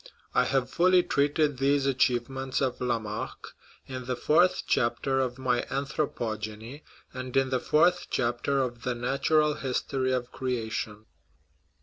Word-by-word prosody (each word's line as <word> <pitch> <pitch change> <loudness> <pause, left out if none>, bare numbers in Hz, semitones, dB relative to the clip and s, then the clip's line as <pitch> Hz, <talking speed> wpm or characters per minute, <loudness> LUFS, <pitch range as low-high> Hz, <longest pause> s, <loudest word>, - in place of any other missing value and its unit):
I 125 - +3
have 135 -2 +1
fully 180 +1 +4
treated 145 -2 +1
these 140 0 +2
achievements 130 0 0
of 130 -3 -1
Lamarck 115 -3 -3 0.3
in 130 -1 -6
the 125 0 -1
fourth 165 +8 +3
chapter 125 +3 +1
of 125 -1 -1
my 125 -2 +1
Anthropogeny, 115 -3 -3 0.3
and 130 0 -4
in 135 0 +2
the 130 - +2
fourth 175 +7 +3
chapter 130 +3 0
of 120 -2 -5
the 125 0 -2
Natural 145 +5 +2
History 130 -1 -1
of 125 -1 -2
Creation. 110 -4 -3
130 Hz, 130 wpm, -28 LUFS, 120-140 Hz, 0.3 s, fully